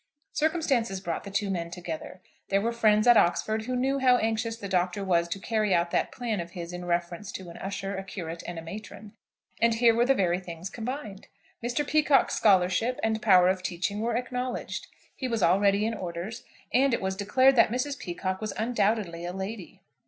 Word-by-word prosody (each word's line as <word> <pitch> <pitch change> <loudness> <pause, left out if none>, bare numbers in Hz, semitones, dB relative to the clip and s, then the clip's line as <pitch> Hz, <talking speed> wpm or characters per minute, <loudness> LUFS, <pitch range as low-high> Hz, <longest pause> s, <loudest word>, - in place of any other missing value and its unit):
Circumstances 285 - +1
brought 170 -1 -4
the - - -6
two 200 0 -1
men 170 -2 -3
together. 175 +1 -7 0.3
There 195 - +3
were 230 +4 0
friends 215 -2 +3
at 240 -2 +7
Oxford 220 +5 +2
who 255 +1 -2
knew 270 +2 +1
how 255 -1 +5
anxious 225 0 -1
the 205 - -6
Doctor 185 +1 0
was 170 -3 +2
to 170 - -3
carry 215 -2 +1
out 170 0 +1
that - - 0
plan 230 -5 -3
of 170 0 -6
his 175 -1 -6
in 180 0 -6
reference 175 +3 -2
to 185 -2 -7
an - - -11
usher, 195 0 -4
a 195 - -4
curate, 170 -3 -6
and 175 - -5
a 165 - -6
matron, 210 +3 -9 0.5
and 230 0 +4
here 230 0 +5
were 235 +2 +2
the 270 - +4
very 180 -4 +1
things 175 0 -7
combined. 230 -4 -6 0.4
Mr. 245 +5 -1
Peacocke's 300 -2 +3
scholarship 195 +4 +3
and 220 0 0
power 185 -4 +6
of 185 0 +1
teaching 185 +3 -2
were 230 0 0
acknowledged; 250 0 -4 0.3
he 260 - -3
was 230 -5 -1
already 200 +3 +3
in 225 - -1
orders; 185 +3 -5 0.3
and 260 0 +4
it - - -5
was 190 0 -1
declared 255 +7 +4
that 230 - +6
Mrs. 255 +4 -2
Peacocke 185 +2 -4
was 215 - -3
undoubtedly 210 -6 0
a 175 +1 -4
lady. 190 -2 -7
205 Hz, 200 wpm, -27 LUFS, 180-235 Hz, 0.5 s, at